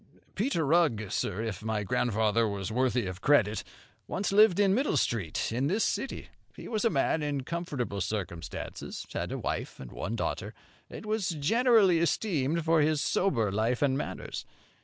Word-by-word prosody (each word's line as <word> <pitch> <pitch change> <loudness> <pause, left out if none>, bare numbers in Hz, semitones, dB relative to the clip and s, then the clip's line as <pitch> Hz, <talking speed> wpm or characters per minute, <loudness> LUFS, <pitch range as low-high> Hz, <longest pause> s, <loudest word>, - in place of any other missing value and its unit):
"Peter 200 - 0
Rugg, 140 - +2
sir, 100 +3 -1
if 105 -4 -4
my 110 -2 -1
grandfather 110 +2 +1
was 100 0 -3
worthy 125 0 +1
of 90 0 -6
credit, 110 -8 +3 0.4
once 195 +1 -2
lived 205 -2 +6
in 195 -2 +4
Middle 255 - +1
Street, 105 - -1
in 125 +4 0
this 205 +8 +1
city. 270 - -3 0.3
He - - -9
was 215 -2 -1
a 230 - +4
man 155 -1 +1
in 145 -2 -1
comfortable 140 - -3
circumstances, 90 -4 -5
had - - -3
a - - -2
wife - - -4
and 65 - -9
one 110 +4 -4
daughter, - - -3 0.3
and - - -9
was 215 -2 0
generally 195 - +4
esteemed 165 -3 0
for 165 -1 +4
his 155 0 +2
sober 120 - +1
life 115 +6 0
and 135 -2 +3
manners. 140 - -4
140 Hz, 165 wpm, -29 LUFS, 110-175 Hz, 0.4 s, lived